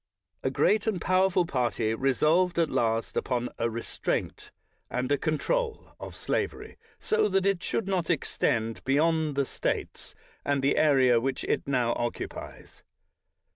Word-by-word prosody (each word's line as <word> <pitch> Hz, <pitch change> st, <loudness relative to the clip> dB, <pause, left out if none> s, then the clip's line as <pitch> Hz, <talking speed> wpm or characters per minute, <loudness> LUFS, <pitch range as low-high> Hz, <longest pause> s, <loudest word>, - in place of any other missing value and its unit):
A -, -, 0 dB
great 215 Hz, +1 st, +2 dB
and 205 Hz, -5 st, 0 dB
powerful 185 Hz, 0 st, +2 dB
partj' 120 Hz, -6 st, 0 dB
resolved 155 Hz, +8 st, +2 dB
at 165 Hz, -2 st, +2 dB
least 115 Hz, -1 st, 0 dB
upon 125 Hz, -1 st, -1 dB
a 115 Hz, 0 st, +1 dB
restraint 115 Hz, +1 st, -3 dB, 0.4 s
and 125 Hz, +2 st, -2 dB
a -, -, +5 dB
control 445 Hz, -, -1 dB
of -, -, -8 dB
slavery, -, -, -3 dB, 0.2 s
so 445 Hz, 0 st, +1 dB
that 190 Hz, 0 st, +1 dB
it 195 Hz, -3 st, +1 dB
should 195 Hz, +2 st, -2 dB
not 185 Hz, -4 st, -1 dB
extend 115 Hz, -7 st, 0 dB
beyond 155 Hz, +2 st, +2 dB
the 140 Hz, 0 st, +1 dB
States -, -, -4 dB, 0.3 s
and 140 Hz, -1 st, 0 dB
the 140 Hz, -, +3 dB
area 130 Hz, -6 st, +5 dB
which 135 Hz, +2 st, -2 dB
it -, -, -1 dB
now 125 Hz, -4 st, +1 dB
occupies. 120 Hz, 0 st, -6 dB
145 Hz, 140 wpm, -28 LUFS, 125-180 Hz, 0.4 s, a